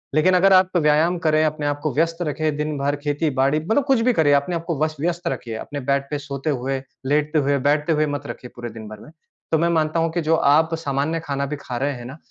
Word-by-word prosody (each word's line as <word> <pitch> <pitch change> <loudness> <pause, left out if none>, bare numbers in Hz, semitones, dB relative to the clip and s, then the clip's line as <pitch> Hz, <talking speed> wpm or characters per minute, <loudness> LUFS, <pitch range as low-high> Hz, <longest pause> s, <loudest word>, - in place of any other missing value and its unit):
लेकिन 180 +4 +4
अगर 190 +2 +5
आप 185 -1 +4
व्यायाम 155 +2 +3
करें, 155 -2 +2
अपने 155 -1 -2
आप 145 0 -1
को 155 -4 -1
व्यस्त 165 +4 +1
रखें, 150 0 -1
दिन 150 0 -2
भर 140 +1 0
खेती 145 +1 0
बाड़ी 140 +3 +3
मतलब 220 - +1
कुछ 270 -4 +3
भी 250 +2 +3
करें 155 -7 +3
अपने 140 +5 +1
आप 165 - -3
को 165 -3 -2
वस 155 0 -1
व्यस्त 175 +2 -2
रखिए। 115 -8 -4
अपने 145 +6 -6
बेड 140 0 +2
पर 150 - -1
सोते 140 +1 -4
हुए, 135 0 -2 0.2
लेटते 150 +3 +1
हुए 140 0 +1
बैठते 150 +2 +2
हुए 155 0 +2
मत 145 -1 -4
रखिए 125 - -8
पूरे 120 -1 -6
दिन 110 -1 -10
भर 110 -1 -10
में, 155 - -14 0.4
तो 160 - +4
मैं 170 +2 +1
मानता 160 -1 +1
हूँ 165 0 +1
कि 175 - -1
जो 160 +1 +2
आप 160 +2 +3
सामान्य 150 +1 -2
खाना 140 -1 -2
भी 145 +2 -4
खा 125 - -5
रहे 140 +4 0
हैं 120 -2 -9
ना 135 +4 -9
150 Hz, 260 wpm, -22 LUFS, 140-165 Hz, 0.4 s, अगर